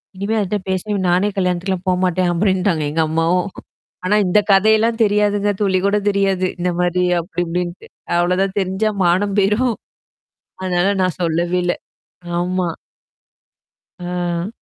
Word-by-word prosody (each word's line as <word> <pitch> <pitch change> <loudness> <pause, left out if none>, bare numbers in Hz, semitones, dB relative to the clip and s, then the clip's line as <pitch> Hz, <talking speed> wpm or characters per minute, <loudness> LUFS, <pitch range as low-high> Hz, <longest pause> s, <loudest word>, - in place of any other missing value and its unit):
இனிமே 200 +4 -2
அதுட்ட 205 0 -1
பேசாத! 195 +2 -1
நானே 185 +4 +2
கல்யாணத்துக்குலாம் 180 0 -1
போமாட்டேன்" 180 -1 +1
அப்டின்ட்டாங்க. 185 -2 +1
எங்க 160 +1 +1
அம்மாவும். 165 +4 +1 0.6
ஆனா, 195 +3 +2
இந்த 195 +4 +4
கதையெல்லாம் 220 +3 +4
தெரியாதுங்க. 205 0 +1
துளி 190 -2 +2
கூட 200 +1 +2
தெரியாது 195 -2 +1
இந்த 180 +1 0
மாரி 180 0 +1 0.2
அப்படி 175 +1 -4
இப்டின்ட்டு. 175 +1 -4 0.3
அவ்வளோதான் 185 +3 +1
தெரிஞ்சா 190 +3 0
மானம் 190 +3 +2
போயிரும். 210 +5 +2 0.9
அதனால 180 +1 +1
நான் 185 -2 0
சொல்லவேல்ல. 175 +1 0 0.7
ஆமா. 180 0 -1 1.3
ஆ. 175 0 -2
185 Hz, 120 wpm, -19 LUFS, 175-200 Hz, 1.3 s, இந்த